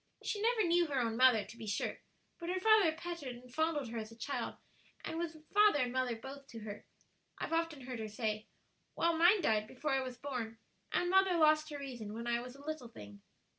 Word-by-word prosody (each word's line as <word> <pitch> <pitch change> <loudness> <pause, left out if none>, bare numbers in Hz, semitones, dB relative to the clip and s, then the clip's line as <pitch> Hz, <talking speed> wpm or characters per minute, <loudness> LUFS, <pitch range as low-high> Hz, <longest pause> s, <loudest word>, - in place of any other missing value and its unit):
She 410 - -2
never 455 0 +3
knew 345 -1 +3
her 280 -3 0
own 230 -2 0
mother, 245 -4 +5
to 225 +3 -12
be 225 -2 -7
sure, 205 +1 -2 0.4
but 340 0 -5
her 370 +1 0
father 435 -4 +6
petted 320 -6 -5
and 250 0 -15
fondled 315 -4 0
her 230 - -3
as 215 0 -7
a 225 - -13
child, 275 +5 -3 0.5
and 325 - -3
was 335 -2 -3 0.2
father 415 -4 +6
and 250 -3 0
mother 255 -2 0
both 270 +4 -9
to 230 -4 -9
her, 210 -1 -8 0.5
I've - - -3
often 330 -3 0
heard 250 -2 -6
her 220 - -3
say; 215 0 -2 0.5
while 335 0 +2
mine 350 +5 +6
died 215 -4 +2
before 280 +5 -3
I 270 0 +2
was 255 -1 -5
born, 240 -4 -4 0.3
and 355 0 +1
mother 380 -2 +5
lost 310 -1 +4
her 295 - -5
reason 240 -7 -6
when 230 +1 -5
I 235 0 +1
was 250 +1 -9
a 280 +1 -14
little 310 -5 -4
thing." 105 - -12
270 Hz, 220 wpm, -34 LUFS, 230-330 Hz, 0.5 s, father